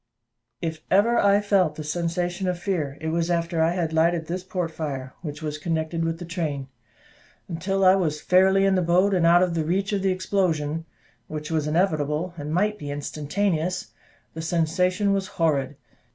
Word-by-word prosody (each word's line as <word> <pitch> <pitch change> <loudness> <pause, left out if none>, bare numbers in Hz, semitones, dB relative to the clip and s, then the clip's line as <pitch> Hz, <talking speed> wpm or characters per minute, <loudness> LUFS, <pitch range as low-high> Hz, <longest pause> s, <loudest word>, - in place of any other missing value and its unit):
If 160 -1 -3
ever 220 +5 +4
I 200 0 +4
felt 190 -6 +2
the 155 - -6
sensation 175 +4 -2
of 180 -1 0
fear, 165 -7 -2
it 160 - -3
was 165 +1 0
after 170 -1 0
I 165 +2 +3
had 170 -3 -2
lighted 165 +1 +2
this 180 +3 -4
port 180 -3 -3
fire, 135 -5 -5
which 150 -2 -6
was 150 0 -3
connected 165 +1 -2
with 165 0 -1
the 175 - -7
train. 155 -6 -3 0.8
Until 190 +3 -1
I 185 - +8
was 160 -6 0
fairly 190 +3 +4
in 195 - +3
the 185 - +2
boat, 180 +4 +3
and 175 -3 +3
out 175 +1 +6
of 180 -2 0
the 165 -2 0
reach 195 +6 -1
of 200 - 0
the 195 - +1
explosion 165 -5 0 0.4
which 155 0 -6
was 155 -2 0
inevitable, 155 0 0
and 150 -2 -6
might 210 +5 +1
be 145 - -6
instantaneous 160 +5 -2 0.4
the 160 - -5
sensation 180 +5 +1
was 195 -1 -1
horrid. 145 -7 0
170 Hz, 180 wpm, -24 LUFS, 155-185 Hz, 0.8 s, I